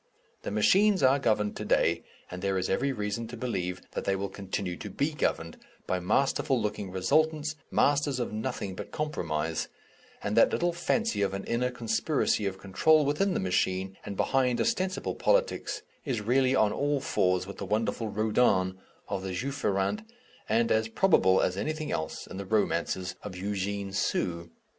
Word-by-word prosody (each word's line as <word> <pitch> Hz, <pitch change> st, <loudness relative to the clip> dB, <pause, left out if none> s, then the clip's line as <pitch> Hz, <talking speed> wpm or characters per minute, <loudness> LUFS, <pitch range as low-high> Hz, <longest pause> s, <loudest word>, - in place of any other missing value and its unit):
The -, -, -4 dB
machines 190 Hz, -, +4 dB
are 135 Hz, +2 st, +5 dB
governed 105 Hz, -5 st, +1 dB
to -, -, -4 dB
day, -, -, +2 dB, 0.3 s
and 90 Hz, 0 st, -6 dB
there 95 Hz, 0 st, 0 dB
is 95 Hz, -, -1 dB
every 140 Hz, +8 st, +1 dB
reason 105 Hz, -1 st, -3 dB
to 120 Hz, +2 st, -8 dB
believe 90 Hz, -7 st, -3 dB
that -, -, -3 dB
they 100 Hz, -, +1 dB
will 100 Hz, +1 st, -3 dB
continue 95 Hz, -2 st, -4 dB
to 105 Hz, -, -7 dB
be 140 Hz, +10 st, -1 dB
governed, 85 Hz, -, -1 dB, 0.3 s
by 90 Hz, -, 0 dB
masterful 135 Hz, +7 st, +1 dB
looking 105 Hz, -2 st, -3 dB
resultants, 155 Hz, -, +1 dB
masters 145 Hz, -2 st, +2 dB
of 120 Hz, -, -2 dB
nothing 110 Hz, -3 st, -3 dB
but -, -, -7 dB
compromise, 80 Hz, -, -2 dB, 0.6 s
and -, -, -1 dB
that -, -, +6 dB
little 175 Hz, 0 st, +1 dB
fancy 225 Hz, -, 0 dB
of 100 Hz, -1 st, 0 dB
an 100 Hz, -, -4 dB
inner 125 Hz, +2 st, 0 dB
conspiracy 115 Hz, -1 st, 0 dB
of 95 Hz, -1 st, -4 dB
control 150 Hz, +12 st, +3 dB
within 180 Hz, +7 st, +1 dB
the -, -, +1 dB
machine 95 Hz, +1 st, 0 dB
and 100 Hz, -1 st, -6 dB
behind 130 Hz, -2 st, +2 dB
ostensible 185 Hz, -5 st, 0 dB
politics -, -, 0 dB, 0.2 s
is 130 Hz, -6 st, -1 dB
really 130 Hz, +4 st, +2 dB
on 110 Hz, -5 st, +3 dB
all 145 Hz, 0 st, 0 dB
fours 90 Hz, -7 st, +1 dB
with 100 Hz, -, -9 dB
the 100 Hz, -, -4 dB
wonderful 110 Hz, +2 st, 0 dB
Rodin 105 Hz, -3 st, +2 dB, 0.3 s
(of 95 Hz, -, -3 dB
the 95 Hz, -1 st, -4 dB
Juif 140 Hz, +7 st, -4 dB
Errant) 100 Hz, -, +1 dB, 0.5 s
and 115 Hz, +2 st, +2 dB
as 110 Hz, 0 st, +2 dB
probable 110 Hz, -, +4 dB
as 90 Hz, -, 0 dB
anything 155 Hz, +10 st, -3 dB
else 80 Hz, 0 st, -3 dB
in -, -, -9 dB
the 100 Hz, -, -5 dB
romances 95 Hz, -3 st, 0 dB
of 100 Hz, -3 st, -7 dB
Eugene 100 Hz, 0 st, -3 dB
Sue. 85 Hz, -3 st, -1 dB
105 Hz, 170 wpm, -29 LUFS, 95-140 Hz, 0.6 s, that